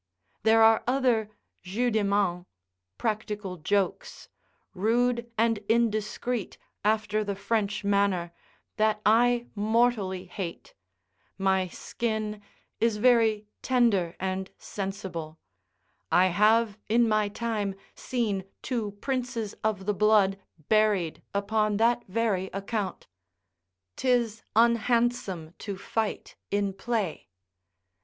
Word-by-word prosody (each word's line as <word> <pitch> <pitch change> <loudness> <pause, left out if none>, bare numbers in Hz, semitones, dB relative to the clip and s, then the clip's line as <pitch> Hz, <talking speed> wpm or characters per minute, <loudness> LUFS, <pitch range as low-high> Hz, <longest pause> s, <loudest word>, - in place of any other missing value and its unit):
There 225 0 +5
are 225 0 +5
other 245 -5 +2 0.3
jeux 235 +7 -1
de 220 -1 +1
main, 200 -3 0 0.5
[practical 210 -4 -3
jokes] 200 - -2 0.4
rude 235 +4 +1
and 225 -1 +2
indiscreet, 225 0 0 0.3
after 215 0 +1
the 200 -1 -3
French 205 0 -1
manner, 200 -4 +1 0.5
that 215 0 +2
I 240 +2 +4
mortally 215 -3 +1
hate; 180 -2 -7 0.6
my 190 -1 +2
skin 215 +2 -3 0.4
is 225 -2 +2
very 225 -2 +3 0.2
tender 220 -9 +2
and 190 0 -2
sensible: 190 -5 -5 0.7
I 185 +1 +5
have 215 +3 +3
in 235 +1 +4
my 215 -1 +2
time 210 -3 -2 0.2
seen 210 -7 -2 0.2
two 225 -6 -2
princes 245 -5 -2
of 210 -3 -1
the 210 - +1
blood 205 -2 +3 0.3
buried 210 -6 +2
upon 210 +1 0
that 235 +2 +2
very 195 -2 0
account. 200 +1 -3 0.9
'Tis 235 -4 +1
unhandsome 230 -7 +2
to 200 -3 -5
fight 220 +2 -3
in 200 -1 0
play. 200 - -3
215 Hz, 105 wpm, -27 LUFS, 195-230 Hz, 0.9 s, There